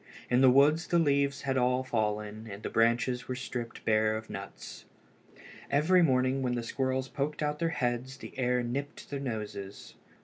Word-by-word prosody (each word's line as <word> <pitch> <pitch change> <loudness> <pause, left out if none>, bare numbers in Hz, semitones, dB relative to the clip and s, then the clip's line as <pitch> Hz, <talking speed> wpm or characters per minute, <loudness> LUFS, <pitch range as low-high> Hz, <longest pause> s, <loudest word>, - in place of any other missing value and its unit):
In 125 +1 +4
the 130 - +8
woods 145 +5 +4
the 175 - +2
leaves 140 -3 +2
were 135 -1 +1
all 125 +1 +2
fallen 110 -2 -2
and 100 +1 -8
the - - -4
branches 120 +2 +2
were 130 - -3
stripped 120 -2 -6
bare 110 0 +3
of 110 0 -9
nuts. - - -8 0.8
Every 160 +6 +4
morning 130 -3 +2
when 125 -1 0
the 120 - -2
squirrels 130 +2 -1
poked 145 +3 -3
out 150 0 -1
their 165 -1 +1
heads 130 -2 -2
the - - -10
air 125 -1 +1
nipped 140 +6 -5
their 140 - -2
noses. 105 -6 -6
130 Hz, 175 wpm, -30 LUFS, 115-140 Hz, 0.8 s, the